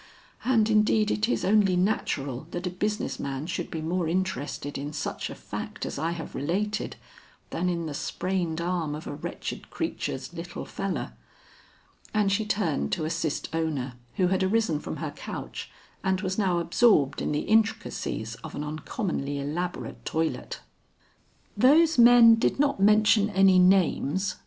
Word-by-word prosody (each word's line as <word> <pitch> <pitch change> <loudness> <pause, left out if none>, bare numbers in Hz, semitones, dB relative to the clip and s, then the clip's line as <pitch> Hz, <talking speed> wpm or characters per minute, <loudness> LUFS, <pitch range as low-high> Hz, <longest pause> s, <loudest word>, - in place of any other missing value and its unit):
And 230 -4 +3
indeed 215 0 +3
it 215 +3 0
is - - 0
only 195 -2 +4
natural 155 - -1
that 175 +1 -5
a 180 - -1
business 210 +3 -2
man 135 +1 -3
should 170 - -3
be 160 -1 -4
more 170 +1 -1
interested 165 -5 -2
in 145 +2 -4
such - - -3
a - - -7
fact - - -6
as - - -4
I 165 - 0
have 170 -1 -5
related, 195 +9 -2 0.6
than 180 +2 0
in 170 -2 -2
the 155 - -4
sprained 175 +1 -2
arm 170 -3 -1
of 155 - -8
a - - -5
wretched 145 - -6
creature's 135 +6 -4
'little 175 +1 -6
feller.'" 195 -1 -4 1.0
And 205 -2 +3
she 210 +2 0
turned 165 - 0
to 155 - -1
assist 155 -1 -2
Ona, 150 -6 -2 0.2
who 180 -2 +2
had 190 0 +1
arisen 190 -5 +1
from - - -5
her - - -4
couch - - -7 0.3
and 190 0 +1
was 190 -2 -2
now 190 -4 +1
absorbed 170 - +3
in - - -1
the 150 - 0
intricacies 220 - 0
of - - -7
an 145 - -3
uncommonly 150 - -3
elaborate 160 +6 -4
toilet. 160 0 -2 0.9
"Those 310 +2 +5
men 235 -1 +8
did - - +1
not 280 -6 +2
mention 210 +1 +5
any 190 -2 +5
names?" 185 -1 +2
180 Hz, 155 wpm, -27 LUFS, 155-210 Hz, 1.0 s, men